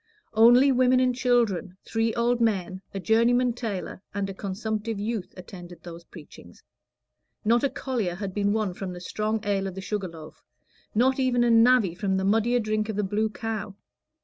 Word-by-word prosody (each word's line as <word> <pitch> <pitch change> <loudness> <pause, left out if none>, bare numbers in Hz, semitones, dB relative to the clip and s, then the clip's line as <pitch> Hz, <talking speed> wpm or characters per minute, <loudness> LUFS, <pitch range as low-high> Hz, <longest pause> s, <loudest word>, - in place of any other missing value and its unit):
Only 240 +5 +6
women 255 0 +4
and 255 -1 +2
children, 230 -8 0
three 225 0 0
old 240 0 +1
men, 190 -4 0
a 195 - -5
journeyman 235 +4 +2
tailor, 215 -6 -5
and 200 -1 -1
a 195 - -6
consumptive 210 +2 -4
youth, 210 -2 -3
attended 175 -2 -11
those 170 -1 -10
preachings; 115 - -14 0.8
not 235 +3 +3
a 280 - +2
collier 230 -12 -3
had 190 0 -5
been 205 0 +1
won 215 -3 -1
from 185 0 -6
the 175 - -8
strong 215 +4 -2
ale 200 -2 0
of 190 - -7
the - - -6
Sugar 195 0 -3
Loaf, 160 -2 -12 0.5
not 260 +4 +3
even 250 -2 +2
a 240 - +3
navvy 230 -5 +5
from 190 +1 -1
the 190 - -1
muddier 225 +4 +2
drink 215 -1 -1
of 215 - -3
the 210 - 0
Blue 210 +3 0
Cow. 215 -2 -5
215 Hz, 180 wpm, -26 LUFS, 190-235 Hz, 0.8 s, Only